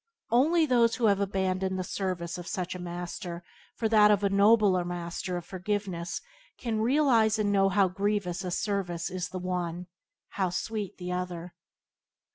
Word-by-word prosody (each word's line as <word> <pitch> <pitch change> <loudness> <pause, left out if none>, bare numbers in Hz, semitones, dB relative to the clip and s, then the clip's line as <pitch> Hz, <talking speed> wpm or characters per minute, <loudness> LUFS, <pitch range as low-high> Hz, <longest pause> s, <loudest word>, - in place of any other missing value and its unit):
Only 315 +8 +4
those 235 -4 +3
who 240 - 0
have 200 -2 +4
abandoned 190 -1 -1
the 185 - -2
service 180 -2 -3
of 175 - -8
such 180 -1 -3
a 180 - -7
master 175 0 -6 0.3
for 225 - 0
that 210 -1 +6
of 205 -1 +4
the 200 -1 +1
nobler 200 -2 +5
master 175 +1 -4
of 175 - -7
forgiveness 185 -2 -3 0.4
can 225 -3 -2
realize 235 -4 +3
and 205 -1 +1
know 195 -1 +4
how 195 0 +3
grievous 195 -1 -1
a 185 - -3
service 180 -4 -2
is 185 -1 -3
the 185 - -5
one, 180 -1 -3 0.4
how 190 -2 -1
sweet 205 +2 -4
the 180 0 -5
other. 180 -1 -4
190 Hz, 165 wpm, -28 LUFS, 180-210 Hz, 0.4 s, that